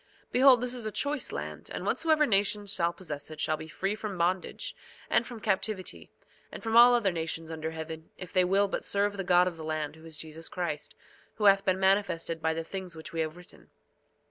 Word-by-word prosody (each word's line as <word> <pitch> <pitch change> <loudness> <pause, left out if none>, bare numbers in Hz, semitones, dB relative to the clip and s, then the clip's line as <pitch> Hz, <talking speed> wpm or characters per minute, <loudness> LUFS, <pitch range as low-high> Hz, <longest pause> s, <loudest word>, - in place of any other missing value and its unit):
2:12 - - -42
Behold, 255 -1 +7
this 250 0 -1
is 240 -3 -4
a - - -3
choice 285 +5 -1
land, - - -6
and - - -5
whatsoever 310 -2 +3
nation 205 -2 +2
shall 175 -4 +1
possess 150 -6 -7
it 155 -1 -9
shall 155 +1 +1
be 155 - -8
free 195 +5 -2
from 210 -3 -5
bondage, 180 +2 -1 0.4
and 230 - +3
from 240 -3 -8
captivity, 205 -2 -2 0.4
and - - -9
from 225 0 -1
all 240 +1 +9
other 215 -5 +2
nations 165 -1 -3
under 160 0 -3
heaven, 160 0 -7
if 180 -2 -9
they 185 -1 +5
will 195 +3 +3
but - - -3
serve 200 0 0
the 195 - -3
God 180 0 +4
of 175 -2 -4
the 160 - -7
land, 155 -1 -3
who 160 - -16
is 160 -2 -7
Jesus 160 +1 -7
Christ, 170 -5 -4 0.4
who 215 - -5
hath 195 -1 +6
been 190 -1 +1
manifested 190 -4 +1
by 160 - +1
the 165 0 -3
things 185 0 -6
which 160 +3 -9
we 165 - -3
have 160 +1 -2
written. 180 0 -16
185 Hz, 220 wpm, -29 LUFS, 160-205 Hz, 0.4 s, all